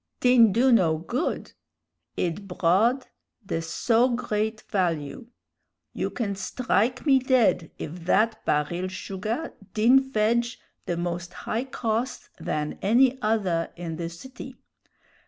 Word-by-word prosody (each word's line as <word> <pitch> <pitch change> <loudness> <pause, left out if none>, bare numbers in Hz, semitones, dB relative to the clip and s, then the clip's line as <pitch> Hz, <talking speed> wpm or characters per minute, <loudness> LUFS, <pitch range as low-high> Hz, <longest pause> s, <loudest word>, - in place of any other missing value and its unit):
"Din 245 -4 +6
do 250 +6 +3
no 175 -9 +4
good! 235 - -3 0.7
Id 180 +3 -2
broughd 195 +9 +2 0.4
the 165 -3 -2
so 225 +9 +2
great 220 -3 -2
value! 170 - -2 0.7
You - - -2
can 215 -5 -2
strike 250 +4 0
me 270 -3 +5
dead 250 - +2
if 170 +2 -7
thad 220 +4 +3
baril 170 +5 0
sugah 205 +10 -4 0.2
din 235 +5 +6
fedge 235 +2 +1 0.3
the 170 - -1
more 175 0 -2
high 230 +7 -3
cost 235 -1 -3
than 150 0 -3
any 250 +5 +3
other 195 -7 0
in 170 -2 -5
the 165 0 -3
city. 255 +11 -10
215 Hz, 120 wpm, -26 LUFS, 175-240 Hz, 0.7 s, Din